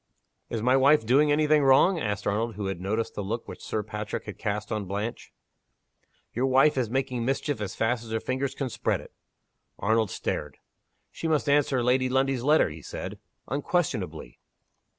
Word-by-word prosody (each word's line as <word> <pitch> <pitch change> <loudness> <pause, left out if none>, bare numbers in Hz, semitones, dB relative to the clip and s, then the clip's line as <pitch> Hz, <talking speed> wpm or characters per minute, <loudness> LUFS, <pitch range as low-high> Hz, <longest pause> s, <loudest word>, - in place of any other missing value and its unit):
"Is 115 -2 -3
my 125 +2 +4
wife 135 -1 +5
doing 145 +6 +4
any 150 +1 +3
thing 150 0 +4
wrong?" 140 +7 +5
asked 105 -6 -2
Arnold, 110 +3 -1
who 105 - -4
had 95 -2 -3
noticed 110 +4 -2
the - - -4
look 110 +4 -4
which - - -9
Sir 110 - -2
Patrick 105 0 -5
had 105 - -8
cast 105 0 -3
on 105 -2 -2
Blanche. 105 +5 -4 1.0
"Your 125 +3 +1
wife 135 +3 +4
is 125 -4 0
making 130 -1 -1
mischief 135 0 -1
as 100 -3 -4
fast 115 +1 0
as 115 - -11
her 110 0 -1
fingers 130 +3 -2
can 135 -2 -3
spread - - 0
it." - - -13 0.6
Arnold 110 0 +1
stared. 75 -4 -4 0.5
"She 165 - -4
must 155 -2 +1
answer 140 -3 +3
Lady 130 +1 +2
Lundie's 135 -1 +1
letter," 150 - +4
he 80 +1 -9
said. - - -7 0.3
"Unquestionably." 125 - -2
120 Hz, 180 wpm, -27 LUFS, 105-135 Hz, 1.0 s, wife